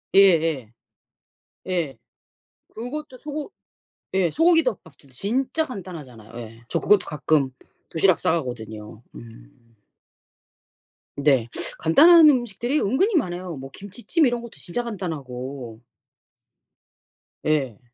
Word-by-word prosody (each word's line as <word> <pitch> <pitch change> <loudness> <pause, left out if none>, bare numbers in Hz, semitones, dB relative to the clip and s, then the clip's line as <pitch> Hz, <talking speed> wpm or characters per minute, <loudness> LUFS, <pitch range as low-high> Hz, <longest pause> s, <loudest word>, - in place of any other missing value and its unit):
예예. 160 - +4 0.9
예. 165 -9 -2 0.8
그것도 260 +4 -6
소고 300 +6 -6 0.6
예 185 -4 +2
소고기 330 0 +4
덮밥도 160 - -5
진짜 255 - -1
간단하잖아요. 145 - -9
예. 115 0 -10
저 - - 0
그것도 205 -1 +4
가끔 150 -2 +1 0.4
도시락 175 +2 +3
싸 - - +1
가거든요. 110 -7 -5
음. 115 - -15 1.4
네. 135 -5 +2 0.3
간단한 315 - +8
음식들이 245 +2 0
은근히 365 - +1
많아요. 180 - -1
뭐 135 0 -8
김치찜 235 - -1
이런 240 -2 0
것도 235 -1 -10
진짜 215 +7 -4
간단하고. 135 - -6 1.7
예. 135 -8 0
170 Hz, 230 characters per minute, -24 LUFS, -, 1.7 s, 간단한